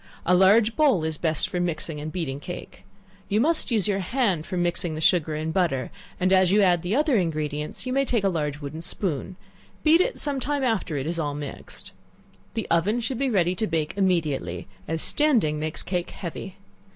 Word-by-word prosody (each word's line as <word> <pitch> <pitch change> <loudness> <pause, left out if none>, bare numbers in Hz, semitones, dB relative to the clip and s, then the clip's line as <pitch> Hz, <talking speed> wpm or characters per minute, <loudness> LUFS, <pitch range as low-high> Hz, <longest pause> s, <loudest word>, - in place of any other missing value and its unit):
A 180 - +3
large 210 +5 +5
bowl 275 - +3
is 160 -1 -3
best 160 -3 +1
for 180 - -3
mixing 160 -3 -2
and 155 +1 -5
beating 155 -6 -3
cake. 175 +4 -9 0.4
You 210 +1 +2
must 315 +6 +2
use 215 -5 +2
your 200 -2 +1
hand 195 -5 0
for 185 - -3
mixing 175 -2 -1
the - - -4
sugar 160 -1 +2
and 160 +1 -3
butter, 165 -9 0 0.3
and 185 +1 +2
as 185 -1 +5
you 205 +1 +5
add 175 -3 +3
the 180 +5 -1
other 295 -3 +3
ingredients, 155 - -2
you 255 - -2
may 275 +1 +3
take 235 -6 0
a - - +3
large 150 -5 -2
wooden 145 +3 -6
spoon; 175 0 -3 0.5
beat 320 +3 +6
it - - 0
some 285 -2 -1
time 285 +1 -1
after 220 - 0
all 135 - -3
is 170 0 -2 0.2
mixed. 145 -1 -8 0.6
The 225 - -2
oven 190 +8 +2
should 245 +1 -3
be 275 -1 +1
ready 180 -6 +2
to 215 +4 -1
bake 160 -2 -1
immediately, 155 - 0 0.2
as 160 0 -2
standing 230 - +2
makes 155 +1 -3
cake 175 -1 -2
heavy. 185 +1 -7
180 Hz, 200 wpm, -25 LUFS, 155-220 Hz, 0.6 s, beat